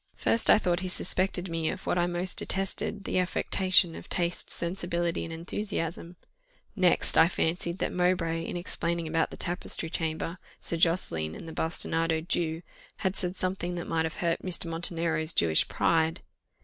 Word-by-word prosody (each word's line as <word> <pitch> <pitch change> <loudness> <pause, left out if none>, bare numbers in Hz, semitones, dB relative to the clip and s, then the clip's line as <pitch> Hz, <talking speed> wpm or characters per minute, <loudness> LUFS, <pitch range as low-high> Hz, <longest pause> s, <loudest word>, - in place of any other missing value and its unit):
First, 230 - +2
I - - +8
thought 175 -4 0
he 185 - -4
suspected 185 0 +1
me 165 -2 -2
of - - -6
what 180 - +1
I 175 - +2
most 175 +1 +2
detested, 195 +1 +1
the 185 - 0
affectation 185 -1 +2
of - - -10
taste, 175 -1 -1
sensibility, 170 -1 -2
and 165 - -7
enthusiasm; 170 0 -4 0.6
next, 185 -4 +4
I 160 - +7
fancied 170 0 -1
that - - -2
Mowbray, 175 -2 +1
in 170 - -4
explaining 170 -1 -1
about 165 +1 +1
the - - -10
tapestry 175 -2 -3
chamber, 165 +2 -3 0.2
Sir 170 - -1
Josseline, 120 - +1
and - - -9
the 160 - -7
bastinadoed 165 0 -1
Jew, 165 0 -1 0.4
had 190 0 +1
said 180 -1 -3
something 185 -1 -3
that 175 - -4
might 160 -1 0
have 160 - -4
hurt 170 -1 -1
Mr. 185 -2 +1
Montenero's 165 -1 0
Jewish 80 -2 +3
pride. 165 +1 +1
170 Hz, 165 wpm, -28 LUFS, 165-180 Hz, 0.6 s, I